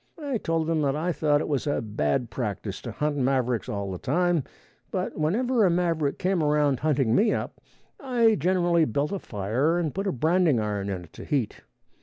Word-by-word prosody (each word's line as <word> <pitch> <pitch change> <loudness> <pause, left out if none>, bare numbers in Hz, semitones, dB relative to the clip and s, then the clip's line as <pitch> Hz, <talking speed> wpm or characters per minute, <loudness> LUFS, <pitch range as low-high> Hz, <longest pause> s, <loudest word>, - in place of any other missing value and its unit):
I 280 -6 -2
told 165 -3 -1
them 160 -1 0
that 140 -1 +1
I 165 +4 -1
thought 150 -2 +2
it - - -3
was 145 -1 -1
a 145 - +1
bad 105 - -1
practice 105 -4 -4
to - - -6
hunt 150 -1 -1
mavericks 125 -4 0
all 100 -1 -3
the 90 - -5
time, 175 +2 +1 0.5
but - - -3
whenever 230 +10 +1
a 190 - +5
maverick 170 -4 0
came 185 -2 0
around 150 -3 +2
hunting 135 -7 +1
me 215 - +4
up, - - -5 0.4
I 240 -5 +3
generally 175 -4 +2
built 140 +5 -1
a 200 - -2
fire 120 - 0
and 165 -5 -1
put 195 +1 -2
a - - +1
branding 160 -1 +2
iron 105 -2 -2
in 90 -3 -5
to - - -9
heat. 135 -8 -2
150 Hz, 195 wpm, -26 LUFS, 125-175 Hz, 0.5 s, a